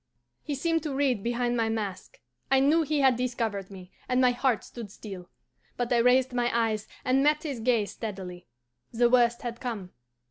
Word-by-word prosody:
He 295 - -4
seemed 330 +4 0
to 295 -3 -4
read 265 -6 +1
behind 240 +2 0
my 225 -1 +1
mask. 205 -4 -4 0.3
I 270 0 +5
knew 295 +5 +4
he 300 -1 0
had 265 -2 +5
discovered 230 -6 -2
me, 185 -2 -11 0.2
and 250 0 +2
my 255 -1 +5
heart 245 -3 0
stood 230 -4 -9
still. 190 -3 -9 0.5
But 245 0 0
I - - +4
raised 250 +2 +4
my 245 -1 +1
eyes 225 -2 0 0.2
and 260 +1 +3
met 300 +1 +3
his 280 -6 -4
gaze 225 -3 +1
steadily. 185 -5 -7 0.4
The 240 +1 +3
worst 240 0 +3
had 235 -1 -5
come. 210 -7 -5
240 Hz, 185 wpm, -28 LUFS, 215-260 Hz, 0.5 s, I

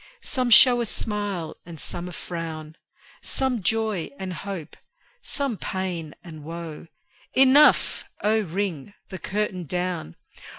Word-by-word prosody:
Some 255 -2 0
show 245 +1 +8
a 235 - 0
smile 205 -7 -2
and 165 -2 -10
some 175 +3 -4
a - - -8
frown; 160 -3 -6 0.5
Some 260 -4 -1
joy 215 -2 0
and 190 -1 -4
hope, 180 -3 -6 0.5
some 275 -7 -1
pain 180 -6 -3
and 155 -3 -10
woe: 165 0 -7 0.5
Enough! 270 +3 +6 0.2
Oh, 215 +2 +4
ring 190 -2 -3
the 185 - -6
curtain 190 -3 -2
down! 175 - -2
185 Hz, 125 wpm, -25 LUFS, 165-215 Hz, 0.5 s, show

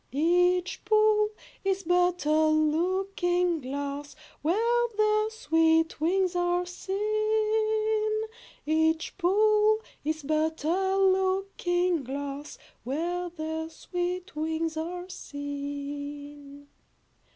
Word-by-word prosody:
Each 355 +5 +2
pool 430 0 +4 0.3
is 390 0 0
but 355 -1 +2
a 310 +1 +3
looking 350 +2 +1
glass, 285 +2 -5 0.3
Where 465 +9 +2
their 430 0 +3
sweet 325 -6 +2
wings 365 +2 +1
are 355 0 +1
seen. 430 +3 0 0.6
Each 320 +1 +1
pool 425 +3 +3 0.2
is 310 +1 -2
but 310 +1 0
a 380 +4 +1
looking 375 -3 +1
glass, 280 +2 -6 0.3
Where 345 +7 -2
their 320 -1 -4
sweet 355 +2 -4
wings 320 +1 -2
are 355 +3 -4
seen. 285 -1 -7
350 Hz, 90 wpm, -28 LUFS, 310-390 Hz, 0.6 s, pool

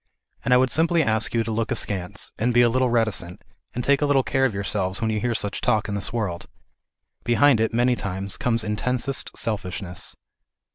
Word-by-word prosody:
And - - -1
I 125 - +7
would 130 0 +2
simply 165 0 +3
ask 110 -3 0
you 115 - +2
to 115 - -4
look 110 0 -1
askance, 100 0 0
and 120 +3 0
be 120 - +6
a 120 - +4
little 130 +1 +1
reticent, 110 -7 -1 0.3
and 125 - -2
take 140 +2 +2
a 145 - +2
little 135 -2 +3
care 135 0 +1
of 125 - 0
yourselves 100 -1 -2
when 110 -1 0
you 110 - -1
hear 120 +1 -1
such 105 -2 -2
talk 110 -1 +1
in 105 - -4
this 100 +2 -1
world; 105 -7 -3 0.8
behind 120 +2 +4
it 110 - +1
many 120 +2 +2
times 100 -2 -4
comes 115 -4 -1
intensest 125 +5 -2
selfishness. 95 -4 -4
115 Hz, 200 wpm, -23 LUFS, 100-125 Hz, 0.8 s, I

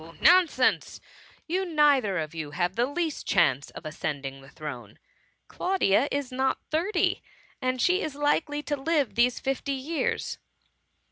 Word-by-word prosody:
nonsense; 355 0 +4 0.5
you 365 +3 -1
neither 290 - +3
of 155 -1 -3
you 160 -3 -5
have 175 +4 -1
the 240 +2 +2
least 320 +1 -3
chance 140 -7 +2
of - - -11
ascending 140 -3 -4
the 135 - -15
throne. 125 -10 -8 0.5
Claudia 285 - +1
is 280 -2 -2
not 265 +1 0
thirty: 350 +5 +1 0.4
and 255 0 -1
she 360 +8 +3
is 310 -2 -3
tikely 295 +1 0
to 290 +1 -1
live 290 -1 0
these 240 +1 +2
fifty 270 +1 -2
years.'' 285 +5 -2
265 Hz, 140 wpm, -27 LUFS, -, 0.5 s, nonsense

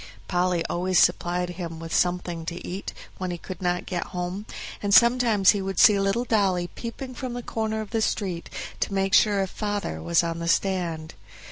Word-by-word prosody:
Polly 180 -1 +1
always 185 +1 0
supplied 180 0 +2
him 170 -2 -6
with 165 0 -7
something 175 -2 0
to 170 0 -5
eat 190 +3 -5 0.3
when 185 -1 -2
he 175 - -3
could 185 +1 -9
not 180 -1 0
get 175 -2 -3
home, 180 +4 -4 0.3
and 205 - -1
sometimes 235 -5 +5
he 205 -2 -2
would 195 -1 -4
see 210 -4 +7
little 195 +5 +1
Dolly 190 -6 +1
peeping 255 +2 -6
from 250 -1 -5
the 245 0 -5
corner 220 -1 -2
of 215 - -8
the 225 -1 0
street, 185 -5 -2 0.3
to 200 - -1
make 195 0 0
sure 200 -1 +5
if 190 - -5
"father" 205 - -3
was 85 +1 +2
on 165 0 -3
the 170 - -4
stand. 170 -4 0
185 Hz, 195 wpm, -25 LUFS, 175-210 Hz, 0.3 s, see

